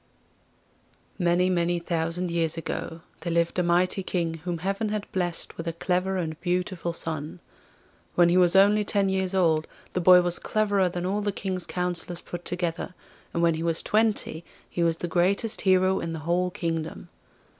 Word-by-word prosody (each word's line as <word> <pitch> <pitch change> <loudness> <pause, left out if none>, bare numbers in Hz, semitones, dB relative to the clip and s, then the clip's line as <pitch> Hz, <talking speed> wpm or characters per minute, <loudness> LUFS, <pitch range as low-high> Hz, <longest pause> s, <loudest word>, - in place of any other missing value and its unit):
Many, 175 0 +3
many 175 -1 +1
thousand 170 +1 -2
years 165 -1 0
ago 165 0 -4 0.2
there 170 - -3
lived 170 +1 +1
a - - +4
mighty 180 +2 +2
King 170 -3 -1
whom 175 -2 -1
heaven 195 +5 -2
had 210 -1 -2
blessed 175 -3 -2
with 165 - -5
a 165 - -1
clever 180 +2 0
and 160 -3 -4
beautiful 180 -1 -1
son. 160 0 -5 0.8
When 175 -1 +6
he 175 - +3
was 180 0 +4
only 205 +2 +6
ten 200 -1 +1
years 190 0 -1
old 160 -4 +2 0.3
the 180 - 0
boy 180 +1 +7
was 175 0 0
cleverer 205 -3 +1
than 175 0 -4
all 200 +3 0
the 205 0 0
King's 185 -2 -4
counsellors 180 -1 -3
put 175 0 -7
together, 180 0 -3 0.4
and 170 - -1
when 170 -1 +4
he 160 - -4
was 165 -1 0
twenty 215 -6 +1 0.2
he 175 - -3
was 165 -1 +2
the 175 - -3
greatest 190 +6 +1
hero 185 -1 +3
in 165 0 -4
the - - -4
whole 180 +2 +1
kingdom. 165 -2 -4
175 Hz, 175 wpm, -26 LUFS, 170-185 Hz, 0.8 s, boy